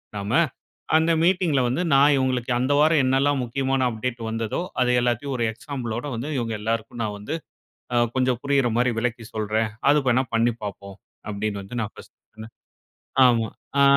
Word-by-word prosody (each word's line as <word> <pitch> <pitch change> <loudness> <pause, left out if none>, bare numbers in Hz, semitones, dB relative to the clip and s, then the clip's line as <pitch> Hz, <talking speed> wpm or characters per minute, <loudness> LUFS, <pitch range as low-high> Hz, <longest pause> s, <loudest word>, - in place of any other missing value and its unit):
நாம. 100 +1 -4 0.7
அந்த 160 +1 +3
மீட்டிங்க்ல 175 -6 +2
வந்து 130 +9 0
நான் 140 +2 +6
இவுங்களுக்கு 130 -1 0
அந்த 130 +3 +1
வாரம் 155 -1 +4
என்னலாம் 135 +1 +2
முக்கியமான 130 +1 0
அப்டேட் 120 +2 -4
வந்ததோ, 115 +5 -2 0.2
அத 125 - +3
எல்லாத்தயும் 125 +3 -1
ஒரு 120 - 0
எக்ஸாம்பிளோட 120 -1 -5
வந்து 130 +7 -4
இவங்க 115 -2 -2
எல்லாருக்கும் 115 +1 -3
நான் 105 -1 -3
வந்து 145 +11 -4 0.8
கொஞ்சம் 130 -2 +1
புரியிற 140 -3 +2
மாரி 125 0 +3
விளக்கி 115 -1 -2
சொல்றேன். 110 +1 0 0.2
அது 150 - +5
வேணா 125 +2 +3
பண்ணி 115 +1 +3
பாப்போம்" 100 -1 -7 0.3
அப்டீன்னு 100 0 -3
வந்து 115 +5 -7
நான் 105 - -3
1 - - -15 0.2
சொன்னேன். 110 +1 -11 0.7
ஆமா. 115 -2 +2 0.3
ஆ. - - +7
120 Hz, 160 wpm, -24 LUFS, 110-135 Hz, 0.8 s, ஆ